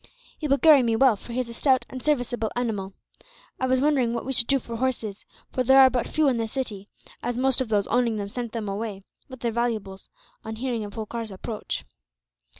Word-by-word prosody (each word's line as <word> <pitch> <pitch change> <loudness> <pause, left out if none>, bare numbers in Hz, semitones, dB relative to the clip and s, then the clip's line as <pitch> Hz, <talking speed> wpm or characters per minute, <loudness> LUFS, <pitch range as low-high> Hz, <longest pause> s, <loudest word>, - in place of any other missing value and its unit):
He 305 - -2
will 275 0 +3
carry 300 -2 +7
me 230 -2 +1
well, 255 -1 +5
for 220 - -12
he 240 - -2
is 250 - -5
a - - -7
stout 260 0 +2
and 255 - -8
serviceable 245 -6 0
animal. 210 -6 -2 0.7
I 260 - 0
was 260 0 +2
wondering 260 -5 +2
what 235 - -4
we 265 - 0
should 235 -2 +5
do 275 - +4
for 235 -2 -6
horses; 225 -5 -2 0.3
for 255 - 0
there 265 +2 +6
are 260 -1 +8
but 245 -1 -1
few 310 -1 +2
in 255 -3 +2
the 225 -1 -1
city, 215 -5 -5 0.3
as 240 0 -2
most 265 0 +2
of 250 - -2
those 205 -2 +2
owning 240 -1 +1
them 200 -1 -3
sent 235 +1 -5
them 225 -3 -4
away, 200 -1 -4 0.3
with 260 -2 -10
their 235 - 0
valuables, 220 -5 -3 0.3
on 220 0 -5
hearing 235 -1 -2
of 205 -1 -8
Holkar's 225 0 -5
approach." 210 +3 -5
235 Hz, 225 wpm, -25 LUFS, 220-260 Hz, 0.7 s, are